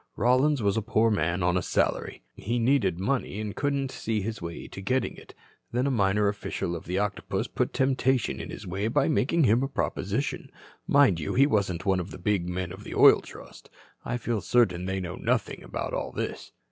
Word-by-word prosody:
Rollins 130 +3 +3
was 100 +1 +2
a - - +1
poor 110 +2 +2
man 90 -2 0
on 90 0 +2
a 90 - +2
salary. - - -1
"He 115 +5 -3
needed 115 -7 +2
money 110 -1 -1
and 105 -1 -4
couldn't 140 -1 -1
see 110 -3 -2
his 110 +1 -4
way 85 0 -6
to 95 - -9
getting 125 +6 0
it. - - -15 0.4
Then 125 +2 0
a 140 - +1
minor 105 -3 +2
official 100 -4 -3
of 85 - -7
the 90 +3 -2
Octopus 100 -1 -1
put - - -1
temptation 130 -2 +1
in - - -7
his - - -8
way 95 +4 -2
by 115 - +2
making 160 +1 +2
him 120 0 +4
a 135 - 0
proposition. 135 - -2 0.4
Mind 140 -12 +5
you, 75 - -3
he 135 - +6
wasn't 100 - 0
one 95 -2 +2
of 90 +1 -5
the - - -8
big 90 -1 0
men 90 0 -3
of 95 +3 -9
the - - -7
Oil - - +7
Trust. - - -13 0.3
I 125 - -2
feel 115 -3 -2
certain 95 -8 +2
they 95 +1 -2
know 90 -1 -5
nothing - - -1
about - - -5
all - - -3
this. - - -5
105 Hz, 210 wpm, -27 LUFS, 95-125 Hz, 0.4 s, Oil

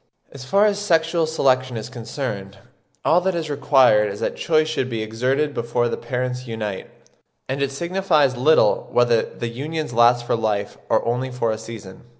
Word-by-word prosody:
As 135 -2 -10
far 200 +9 +3
as 205 -1 +1
sexual 165 -4 +1
selection 130 -5 +1
is 110 - -5
concerned, 115 -5 -6 0.5
all 170 +3 +4
that 190 0 0
is 160 -3 -3
required 130 -7 +4
is 100 - -8
that - - -2
choice 155 -2 +1
should 135 -5 -2
be 115 -2 -3
exerted 130 +7 -1
before 120 +1 -1
the - - -2
parents 125 0 -4
unite, 105 -4 -5 0.6
and 135 +1 -3
it 140 - +1
signifies 160 -2 +1
little 150 +6 +3
whether 120 -2 +3
the 120 - -6
unions 150 +3 -4
last 120 +1 +4
for - - +1
life 105 -3 -2
or 110 - +2
only 125 +2 -1
for 125 -3 -1
a 110 - -3
season. 110 -4 -10
125 Hz, 175 wpm, -21 LUFS, 115-155 Hz, 0.6 s, all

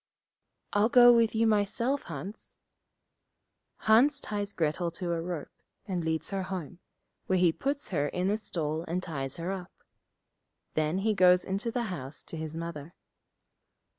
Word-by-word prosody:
'I'll 205 +2 +3
go 245 0 +8
with 230 -1 +3
you 225 +1 +3
myself, 225 +6 +1
Hans.' 170 +6 -8 1.3
Hans 255 +7 +5
ties 205 -5 -3
Grettel 170 0 0
to 175 -1 -3
a 165 - -1
rope, 170 -3 -5 0.4
and 180 -4 -2
leads 160 +1 -1
her 195 -1 -1
home, 180 -3 -5 0.5
where 185 - +2
he 175 -2 +4
puts 280 - -3
her 145 -7 0
in 180 +5 -1
a 210 - +1
stall, 160 -7 -2
and 180 +2 -2
ties 135 -6 -4
her 170 +3 -3
up. 185 -2 -8 0.9
Then 155 +3 0
he 220 - +3
goes 180 -2 +5
into 200 +5 -2
the 240 +1 -1
house 135 -2 -7
to - - -8
his 160 -1 -5
Mother. 165 -1 -6
180 Hz, 155 wpm, -29 LUFS, 160-215 Hz, 1.3 s, go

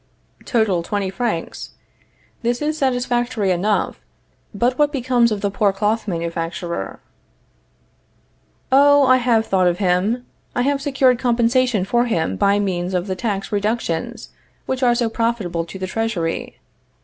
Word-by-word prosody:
Total, 220 -8 +1
twenty 195 +2 -2
francs. 215 -6 -3 0.7
This 240 +1 0
is 300 +1 -1
satisfactory 245 -6 0
enough. 200 +4 0 0.5
But 240 +5 0
what 295 0 +3
becomes 250 -4 +2
of 210 -2 -2
the 200 -1 0
poor 200 0 +2
cloth 210 +3 -1
manufacturer? 170 - -4 1.7
Oh, 285 +1 +6
I 255 0 +5
have 235 -3 +2
thought 185 -3 +2
of 175 0 +1
him. 200 +6 +1 0.3
I 245 - +1
have 280 +1 0
secured 265 -3 +2
compensation 240 -3 +2
for 240 +4 +2
him 165 - -1
by 200 - +3
means 185 -2 -1
of 180 0 0
the 190 -2 -3
tax 200 -1 -3
reductions 205 -5 -2 0.4
which 260 0 -2
are 240 -2 +4
so 240 -1 +1
profitable 220 -8 -1
to 180 - -9
the 190 - -3
Treasury. 190 -5 -3
220 Hz, 140 wpm, -20 LUFS, 185-245 Hz, 1.7 s, Oh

